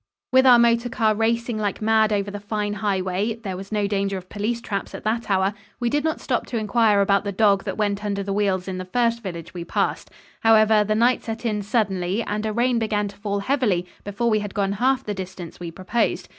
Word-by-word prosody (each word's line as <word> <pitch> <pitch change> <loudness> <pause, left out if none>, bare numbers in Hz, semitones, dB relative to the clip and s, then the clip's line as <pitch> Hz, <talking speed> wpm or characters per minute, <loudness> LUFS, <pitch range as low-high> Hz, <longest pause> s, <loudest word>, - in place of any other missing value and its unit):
With 260 +1 +5
our 245 -1 +9
motor 235 0 +3
car 225 -3 +2
racing 230 +1 0
like 205 -2 -2
mad 220 0 +3
over 200 -1 0
the 205 - -6
fine 205 0 -2
highway 195 +1 -1
there 210 -5 -6
was 195 +2 -9
no 210 -1 +1
danger 200 -1 -1
of 185 0 -10
police 215 +3 -2
traps 200 -4 -4
at - - -8
that 225 +1 -1
hour 195 +1 +2 0.3
we 240 -1 0
did 295 0 +1
not 315 0 -1
stop 245 - -2
to 240 - -3
inquire 215 -1 +3
about 200 0 +2
the 200 - -3
dog 200 -1 +3
that - - -4
went 205 -1 -1
under 200 -1 -2
the 195 0 -3
wheels 195 -2 0
in 185 -1 -4
the 185 - -5
first 235 +4 0
village 170 -5 -7
we 175 -2 -5
passed. 170 - -1 0.3
However, 215 -1 +5
the 215 +1 0
night 240 +3 +3
set 225 +1 -5
in 210 -2 0
suddenly 200 -2 0
and 210 +1 -2
a - - -1
rain 240 +2 +1
began 210 -2 -1
to 200 - -13
fall 200 -1 -2
heavily 210 -7 +1 0.2
before 225 +4 -1
we 215 - +3
had 205 -2 -6
gone 200 -1 +1
half 255 +6 +1
the 210 - -3
distance 185 -3 -8
we 175 -1 -5
proposed. 190 +7 -1
210 Hz, 230 wpm, -23 LUFS, 195-230 Hz, 0.3 s, our